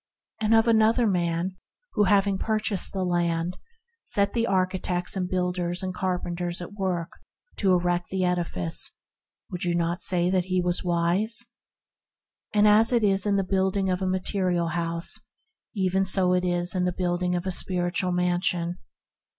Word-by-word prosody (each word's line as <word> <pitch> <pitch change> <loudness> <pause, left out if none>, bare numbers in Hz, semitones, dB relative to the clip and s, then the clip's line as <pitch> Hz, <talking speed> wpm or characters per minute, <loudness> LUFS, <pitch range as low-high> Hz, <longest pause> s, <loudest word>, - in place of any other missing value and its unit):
And 220 +1 +3
of 225 +1 +4
another 225 +1 +4
man, 180 -1 -1 0.4
who 210 -2 +3
having 195 0 +2
purchased 215 -3 -1
the 190 -1 -2
land, 175 0 -1 0.4
set 200 - -1
the 230 -1 0
architects 185 -2 -1
and 180 -2 -2
builders 180 -1 -1
and 185 -1 -3
carpenters 175 -1 -2
at 175 +3 -8
work 185 -4 -2 0.5
to 195 -3 +2
erect 175 0 0
the 190 -1 -1
edifice, 170 - -1 0.6
would 180 - -4
you 175 -1 0
not 170 +1 -1
say 180 -1 +2
that 185 -2 +1
he 185 -1 0
was 180 0 0
wise? 180 +7 +1 1.1
As 210 +2 +5
it 235 -3 +2
is 195 0 +3
in 200 - +2
the 195 - +1
building 190 0 0
of 180 +1 -2
a 190 - 0
material 185 -2 -1
house, 170 0 0 0.6
even 190 -1 +1
so 185 -1 +3
is 175 -1 +1
it - - -9
in 180 -1 +1
the 180 - +1
building 180 0 -1
of 175 +1 -3
a 190 - -1
spiritual 180 0 +1
mansion. 175 0 0
180 Hz, 160 wpm, -25 LUFS, 175-195 Hz, 1.1 s, As